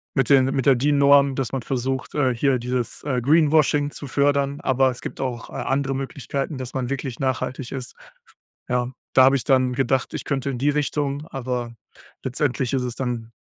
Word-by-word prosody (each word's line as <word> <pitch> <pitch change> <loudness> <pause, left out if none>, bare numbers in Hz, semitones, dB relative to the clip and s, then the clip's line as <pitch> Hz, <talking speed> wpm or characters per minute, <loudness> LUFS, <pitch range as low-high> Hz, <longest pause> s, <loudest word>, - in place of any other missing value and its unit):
Mit 135 -3 +1
den 135 -2 +6
mit 135 -1 -1
der 135 - +6
Dean 145 +4 +2
Norm, 140 -1 +5
dass 135 -4 -2
man 135 -2 -2
versucht, 130 +1 -3
äh, 135 -4 +2
hier 135 +2 +2
dieses, 125 -1 -3
äh, 130 -4 -1
Greenwashing 150 0 +3
zu 145 - -8
fördern. 140 +1 +1
Aber 130 0 +3
es 125 - -6
gibt - - -6
auch, 125 -3 -4
äh, - - -14
andere 135 0 -1
Möglichkeiten, 135 +2 -4
dass 130 -1 -6
man 130 -2 -2
wirklich 135 -3 -4
nachhaltig 130 -1 -2
ist. 130 -3 -6 0.7
Ja, 125 0 0 0.2
da 130 - +7
habe 135 +1 +5
ich - - -4
dann 130 -2 +2
gedacht, 130 0 0
ich - - -4
könnte 140 -1 -1
in 130 - -3
die 140 +3 +2
Richtung, 145 0 -1
aber 125 -2 -4 0.5
letztendlich 130 -1 -1
ist 130 - +1
es 125 -1 -4
dann 120 -3 -4
135 Hz, 195 wpm, -23 LUFS, 125-140 Hz, 0.7 s, da